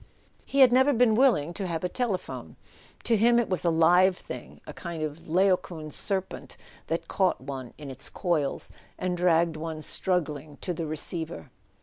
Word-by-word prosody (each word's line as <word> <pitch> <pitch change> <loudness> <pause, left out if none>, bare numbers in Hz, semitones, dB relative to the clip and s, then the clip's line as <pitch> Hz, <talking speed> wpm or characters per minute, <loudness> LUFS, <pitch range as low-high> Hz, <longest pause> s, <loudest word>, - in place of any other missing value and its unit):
He 275 - +2
had 255 -2 +8
never 260 +3 +4
been 240 -2 +4
willing 215 - +3
to 195 +1 -4
have 165 -1 -3
a - - +1
telephone. 205 -1 -4 0.5
To 230 - +2
him 235 +3 +4
it 240 - +1
was 185 - 0
a 170 - +3
live 175 +3 +4
thing, - - -9
a - - -8
kind 170 -3 -5
of 155 +2 -6
Laocoon 175 -3 +1
serpent 190 +2 -2 0.3
that 165 +1 -2
caught 190 -2 +1
one 130 -2 -7
in 145 -3 -8
its 130 +1 -3
coils 160 -6 -1 0.3
and 180 -1 -2
dragged 170 -2 +2
one 155 0 -5
struggling 155 -6 -1
to 180 - -2
the 165 -1 -4
receiver. 155 - -4
170 Hz, 175 wpm, -27 LUFS, 155-190 Hz, 0.5 s, had